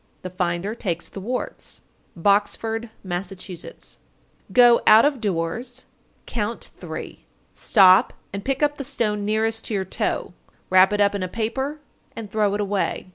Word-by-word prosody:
The 185 - -6
finder 180 +3 -2
takes 175 -8 -4
the - - -9
warts. 245 +5 -5 0.4
Boxford, 220 +4 +1
Mass. 180 0 -3
910. 185 -2 -9 0.5
Go 240 -1 +6
out 220 +3 +8
of 285 -5 0
doors, 215 +7 -3 0.4
count 225 0 -4
three, - - -8 0.3
stop 190 -3 +5 0.2
and 200 0 -5
pick 270 +2 -1
up 290 0 +1
the - - -3
stone 215 -6 -1
nearest 220 +1 0
to 220 - -2
your 190 -1 -1
toe. - - -3 0.4
Wrap 185 +1 +6
it 205 0 +1
up 200 0 +3
in 200 - -3
a 185 - -1
paper, 265 +9 -3 0.3
and 220 -3 -7
throw 210 -1 +1
it 210 - -1
away. 200 -2 -2
210 Hz, 155 wpm, -23 LUFS, 190-235 Hz, 0.5 s, out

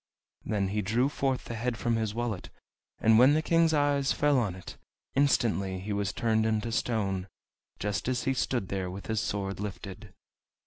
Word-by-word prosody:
Then 100 -3 -1
he 105 +2 -1
drew 115 +7 +1
forth 135 -2 -1
the - - -5
head 115 +1 -2
from 120 -1 0
his 110 -2 -1
wallet, 115 -5 -3 0.5
and 110 0 +5
when 135 +4 +7
the 155 - +1
King's 165 +1 +3
eyes 145 -2 +2
fell 145 -2 +3
on 100 -7 -1
it, 95 - -9 0.4
instantly 115 -9 +2
he 100 +3 -4
was 100 0 -1
turned 110 -1 +1
into 110 +1 0
stone, 100 -5 -1 0.5
just 105 +3 -2
as 130 +3 0
he 135 -2 +1
stood 125 -6 -1
there 95 -2 -2
with 95 +2 -7
his 110 -2 -1
sword 100 -1 -3
lifted! 100 0 -7
110 Hz, 180 wpm, -29 LUFS, 100-130 Hz, 0.5 s, when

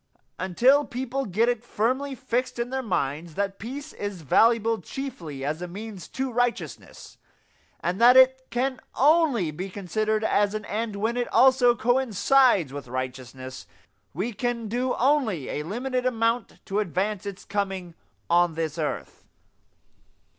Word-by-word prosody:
Until 245 +11 +4
people 265 0 -3
get 215 +5 +2
it 240 -2 0
firmly 260 +5 -1
fixed 255 -1 -2
in 240 +1 -3
their 265 0 -1
minds 160 - -2
that 195 -1 -2
peace 280 +7 -7
is 200 -5 -5
valuable 225 - +3
chiefly 165 - -6
as 155 +3 -2
a 180 - -4
means 200 +1 -8
to 265 -1 -3
righteousness, 245 0 -3 0.6
and 180 +5 -2
that 245 +2 +8
it 260 0 +5
can 260 +2 -1 0.2
only 280 - +3
be 185 +6 -5
considered 215 +3 -1
as 205 -1 +2
an 215 -1 -4
end 215 0 -3
when 220 +4 -1
it 245 - 0
also 255 -2 +5
coincides 245 - +3
with 140 -3 -7
righteousness, 130 +1 -6 0.4
we 200 +9 -3
can 235 +1 -2
do 250 +4 -1
only 245 - +1
a - - -2
limited 250 - -2
amount 230 -2 -1
to 200 +2 -1
advance 200 +2 -1
its 200 -1 -7
coming 195 -4 -3 0.3
on 175 -1 +3
this 160 -1 -3
earth. 150 - -4
220 Hz, 145 wpm, -26 LUFS, 180-250 Hz, 0.6 s, that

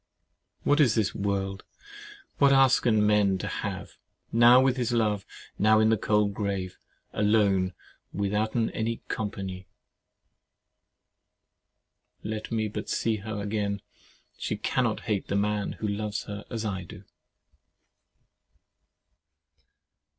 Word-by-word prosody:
"What 145 - +3
is 130 -7 +4
this 110 -4 +1
world? 100 -1 -2 0.8
What 140 -1 +6
asken 125 -5 +4
men 105 -2 +3
to - - -5
have, - - -5 0.3
Now 120 +2 +7
with 130 -1 +3
his 125 -3 -1
love, 105 -4 0 0.3
now 110 +1 +5
in 110 0 +4
the 110 - +4
cold 105 0 +1
grave, 100 -3 -3 0.3
Alone, 100 -3 +2 0.4
withouten 105 +4 0
any 115 +1 -3
compagnie!" 95 -3 -4 2.6
Let 110 +1 -5
me 110 -1 0
but 105 +1 -6
see 115 -1 0
her 105 0 -5
again! 100 -1 -2 0.6
She - - -2
cannot - - 0
hate 100 -3 -2
the - - -2
man 105 0 0
who 110 - -4
loves 105 +1 -3
her 100 0 -7
as 115 -2 -4
I 95 -3 -3
do. - - -12
105 Hz, 115 wpm, -27 LUFS, 100-110 Hz, 2.6 s, Now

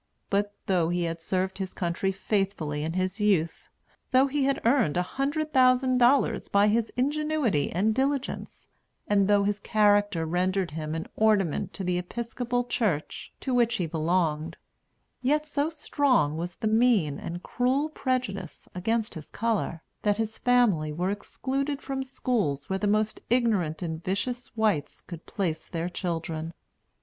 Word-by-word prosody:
But 205 +1 0
though 175 -4 +2
he 175 0 0
had 165 0 -3
served 190 +3 -1
his 190 -1 -4
country 180 +2 -1
faithfully 190 -6 -1
in 160 +2 -2
his 185 +3 -1
youth, 180 -6 +1 0.4
though 260 0 +5
he 280 0 0
had 275 0 +1
earned 235 - +3
a 180 - +2
hundred 290 - -2
thousand 255 0 +4
dollars 250 +3 +3
by 200 +1 +4
his 225 +1 +1
ingenuity 290 - +1
and 205 +6 +2
diligence, 270 +2 -2 0.4
and 200 -2 +3
though 205 -1 +4
his 205 +1 0
character 205 -5 +2
rendered 180 +2 0
him 155 0 -4
an 160 - -3
ornament 205 -7 +2
to 195 - -5
the 180 -1 0
Episcopal 240 +5 -2
Church, 205 -11 -2
to 260 - -2
which 240 -1 +3
he 180 - -1
belonged, 160 0 0 0.6
yet 300 +4 +2
so 290 0 0
strong 280 - +1
was 175 +2 -4
the 220 - -2
mean 215 - +3
and 175 +1 -6
cruel 260 +4 +1
prejudice 250 - -3
against 220 +4 -1
his 155 -3 -9
color, 215 -7 -1 0.2
that 205 -1 +2
his 220 -1 -3
family 220 -12 +3
were 180 +5 -1
excluded 270 +7 -3
from 270 -2 -3
schools 215 - -1
where 190 - 0
the 210 - 0
most 215 +1 +1
ignorant 210 -10 +1
and 160 -1 -4
vicious 240 +7 -2
whites 210 -10 0
could 170 -2 -10
place 165 -6 -2
their 170 0 -3
children. 165 -2 -4
205 Hz, 155 wpm, -27 LUFS, 170-245 Hz, 0.6 s, though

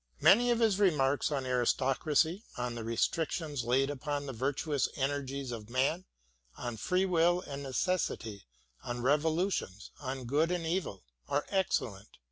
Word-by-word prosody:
Many 245 +4 +6
of 240 - +3
his 215 -4 +3
remarks 145 -8 +2
on 135 -3 -1
aristocracy, 135 - +1
on 125 -1 -2
the 115 -1 -5
restrictions 145 +4 -1
laid 135 +4 +2
upon 145 +1 -3
the 135 - -5
virtuous 140 +3 0
energies 140 -1 -2
of 110 -2 -7
man, 140 +9 0 0.5
on 120 -2 -4
free 180 - +1
will 175 0 +3
and 140 -5 -7
necessity, 130 - -2 0.4
on 120 0 -4
revolutions, 150 - 0
on 130 -2 -5
good 150 +7 +2
and 175 -2 -1
evil, 165 - -2 0.2
are 145 +1 0
excellent. 120 - -1
140 Hz, 140 wpm, -31 LUFS, 125-165 Hz, 0.5 s, Many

